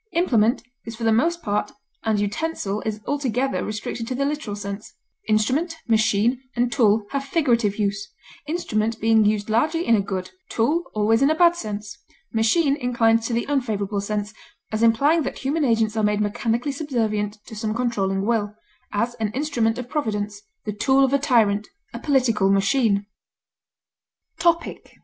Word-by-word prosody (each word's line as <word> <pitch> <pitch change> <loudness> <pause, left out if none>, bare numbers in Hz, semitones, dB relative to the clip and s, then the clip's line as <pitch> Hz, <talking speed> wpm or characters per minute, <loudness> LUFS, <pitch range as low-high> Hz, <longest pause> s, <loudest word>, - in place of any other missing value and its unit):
Implement 240 -9 +2 0.2
is 230 - -7
for 230 - -7
the 225 - +3
most 330 +10 +1
part 205 0 -1 0.3
and 220 -2 +1
utensil 205 -1 -2
is 215 -1 -3
altogether 270 -2 -1
restricted 215 +2 -4
to 255 - -3
the 275 +2 0
literal 285 -8 -3
sense; 200 0 -7 0.3
instrument, 260 +11 +1
machine, 225 +2 +2
and 245 0 +1
tool 220 -4 +3
have 275 -1 -1
figurative 245 - +1
use, 200 -1 -2 0.4
instrument 225 -9 -1
being 220 0 +4
used 210 0 +1
largely 310 +10 +1
in 230 - +4
a 205 - +2
good, 190 -2 -4 0.2
tool 300 +10 +1
always 220 +3 +3
in 275 - +5
a 315 - +2
bad 345 +1 +5
sense; 215 -4 -6 0.3
machine 275 +7 +3
inclines 230 -3 +2
to 240 - -3
the 235 - 0
unfavorable 215 -8 -1
sense, 210 +1 -3 0.4
as 215 0 -1
implying 275 +9 +4
that 270 - -4
human 295 +4 -1
agents 225 -4 +2
are 220 - +1
made 210 0 +1
mechanically 225 +6 -1
subservient 225 -8 -2
to 220 - -10
some 215 0 -2
controlling 200 -5 0
will; 210 -2 0 0.4
as, 230 +4 0
an 215 -2 -1
instrument 245 -5 0
of 250 -1 -5
Providence; 210 -8 -2 0.2
the 210 - -2
tool 265 +6 +3
of 270 0 +2
a 280 - +4
tyrant; 220 -7 +2 0.3
a - - -5
political 245 -9 +2
machine. 200 +1 +2 1.3
TOPIC. 335 -1 0
225 Hz, 165 wpm, -23 LUFS, 210-270 Hz, 1.3 s, in